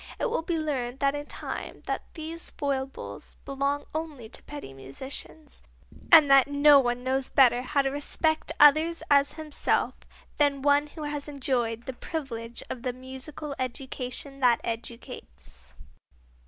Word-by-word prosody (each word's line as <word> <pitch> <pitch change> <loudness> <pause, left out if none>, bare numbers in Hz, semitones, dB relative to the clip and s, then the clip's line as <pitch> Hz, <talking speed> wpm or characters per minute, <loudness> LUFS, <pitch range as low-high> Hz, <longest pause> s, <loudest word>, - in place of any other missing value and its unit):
It - - 0
will - - 0
be 335 0 -2
learned 270 -4 -2
in 290 +1 +1
time - - -6
that - - -2
these 325 +1 -5
foibles 275 -2 -4
belong 280 +1 -1
only 305 -8 -5
to - - -12
petty 290 - -9
musicians, 265 - -7 0.5
and 320 -3 +9
that 275 -1 +6
no 285 0 +6
one 245 -1 0
knows 260 +1 0
better 245 -3 +5
how 280 +2 +1
to 270 - 0
respect 315 +2 -1
others 315 +3 +6
as 280 0 +5
himself 310 -2 0 0.4
than 280 -2 +2
one 290 +1 +4
who 305 +1 -9
has 295 -1 -4
enjoyed 245 -5 -1
the 260 - -4
privilege 240 -5 -6
of 245 - -6
the 250 0 -2
musical 265 +4 -8
education 260 +1 -5
that 245 -3 +4
educates. 225 - -8
275 Hz, 140 wpm, -27 LUFS, 250-295 Hz, 0.5 s, and